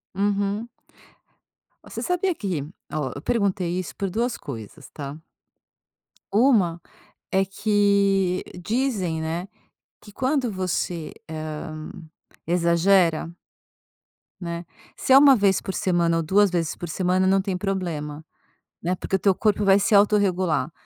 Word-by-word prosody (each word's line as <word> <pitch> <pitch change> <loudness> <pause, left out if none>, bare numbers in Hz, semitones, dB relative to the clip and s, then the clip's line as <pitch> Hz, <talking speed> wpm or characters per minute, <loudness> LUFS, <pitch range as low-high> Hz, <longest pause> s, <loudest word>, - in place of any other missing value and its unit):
Uhum. 205 +2 0 1.2
Você - - -7
sabia 360 +1 0
que, 185 -8 -3 0.3
ó, 150 -5 -2
eu 145 - -7
perguntei 190 -4 0
isso 185 - -6
por 195 -1 -2
2 235 +4 -1
coisas, 115 -7 -9
tá? 140 0 -7 1.2
1 205 -8 +3 0.5
é 190 0 +2
que 200 -2 +2 0.2
dizem, 210 -7 -1
né, 165 +3 -3 0.5
que 210 - -14
quando 260 0 0
você, 180 -3 -2 0.2
hã, 155 0 -6 0.6
exagera 170 0 +2 1.1
né, 170 -1 -5 0.3
se 260 - +2
é - - +10
1 275 -1 +8
vez 200 -3 +2
por 190 - -5
semana 170 -3 +1
ou 165 - 0
2 200 +5 +4
vezes 170 -3 -1
por 175 - -7
semana, 185 +2 +1
não 195 0 +4
tem 190 -1 -2
problema, 165 -6 -3 0.6
né, 180 +2 0
porque 190 - -3
o - - +1
teu 195 +1 +3
corpo 210 0 +1
vai 195 +1 +6
se 205 +1 +2
autorregular. 195 -5 +2
185 Hz, 130 wpm, -24 LUFS, 170-205 Hz, 1.2 s, é